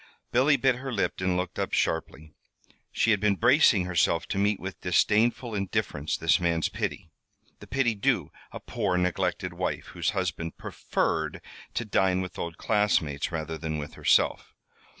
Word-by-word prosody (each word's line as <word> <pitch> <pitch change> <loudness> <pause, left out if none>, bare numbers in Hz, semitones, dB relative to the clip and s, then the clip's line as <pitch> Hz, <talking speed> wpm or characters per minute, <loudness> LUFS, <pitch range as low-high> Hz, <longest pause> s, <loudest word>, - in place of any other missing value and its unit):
Billy 140 +4 +4
bit 130 -1 +2
her 135 +1 -5
lip 100 -5 -1
and 95 -1 +1
looked 90 0 -3
up - - -2
sharply. 80 -1 -1 0.6
She 115 - +2
had 105 - +3
been 105 0 +2
bracing 120 - +4
herself 85 -1 +1
to 95 - -1
meet 100 0 +1
with 95 +1 -7
disdainful 110 +6 +2
indifference 90 -6 -2
this 80 -1 +3
man's 85 -2 +1
pity 80 - -4 0.5
the - - -12
pity 130 -3 +1
due 100 - 0 0.2
a - - -7
poor 90 - -1
neglected 90 -1 -1
wife - - -3
whose - - -1
husband 85 -1 -3
preferred - - -2 0.4
to 120 - -1
dine 95 -3 +2
with 90 -2 -5
old 85 -1 -4
classmates 90 -9 +1
rather 80 -1 -4
than 80 -2 -3
with 75 -1 -6
herself. - - +1
95 Hz, 160 wpm, -27 LUFS, 85-110 Hz, 0.6 s, Billy